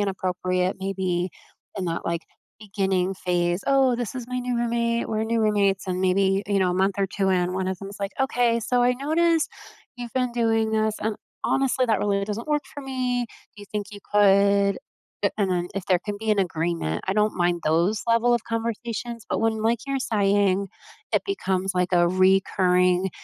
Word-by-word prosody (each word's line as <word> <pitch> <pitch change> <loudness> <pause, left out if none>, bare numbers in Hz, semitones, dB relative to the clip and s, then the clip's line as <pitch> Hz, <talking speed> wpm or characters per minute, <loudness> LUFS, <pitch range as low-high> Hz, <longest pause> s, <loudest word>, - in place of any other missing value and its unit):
inappropriate 185 -1 -1
maybe 185 -2 -1 0.5
in 185 - -2
that, 170 -1 -3
like, 170 0 -1 0.4
beginning 195 -3 0
phase. 175 0 0
"Oh, 270 -2 +4
this 240 0 -4
is 250 -2 -5
my 250 - -2
new 250 -1 -2
roommate. 235 0 0
We're 220 0 -1
new 230 +1 0
roommates," 200 -3 +2
and 185 0 -2
maybe, 195 +1 +2
you 200 -1 +1
know, 185 - +2
a - - -1
month 190 +1 +2
or 195 - +2
2 190 0 -1
in, 180 -1 +1
1 185 0 -2
of 190 - -3
them 195 - -7
is, 200 - -10
like, 200 0 -3
"Okay, 245 -3 +2
so 245 +2 +1
I 245 +1 +4
noticed, 320 +4 +1 0.5
you've 240 -1 -7
been 250 -2 0
doing 225 -2 +1
this, 220 -1 +1
and 220 -1 -2 0.3
honestly, 265 -1 +2
that 220 - +2
really 200 -1 0
doesn't 210 +3 -5
work 295 -1 +1
for 285 - -7
me. 255 -2 -1 0.3
Do 205 - -10
you - - -9
think 205 -1 -2
you 205 - -9
could" 200 0 +4 0.5
a - - +3
and 200 -2 +2
then 175 0 -1
if 195 -2 -3
there 185 -2 +3
can 205 +1 -5
be 220 0 -1
an 210 - -1
agreement, 165 - -2
I - - +3
don't 210 +1 +2
mind 175 -1 +1
those 170 +7 +2
level 230 +1 +3
of 235 - -1
conversations, 230 0 -4
but - - -1
when, 220 -1 0
like 230 +1 +2
you're 275 0 -1
saying, 200 -3 +1 0.4
it - - +2
becomes, 195 - -1
like, 180 0 0
a 175 -1 +4
recurring 185 0 +3
200 Hz, 200 wpm, -24 LUFS, 185-235 Hz, 0.5 s, Oh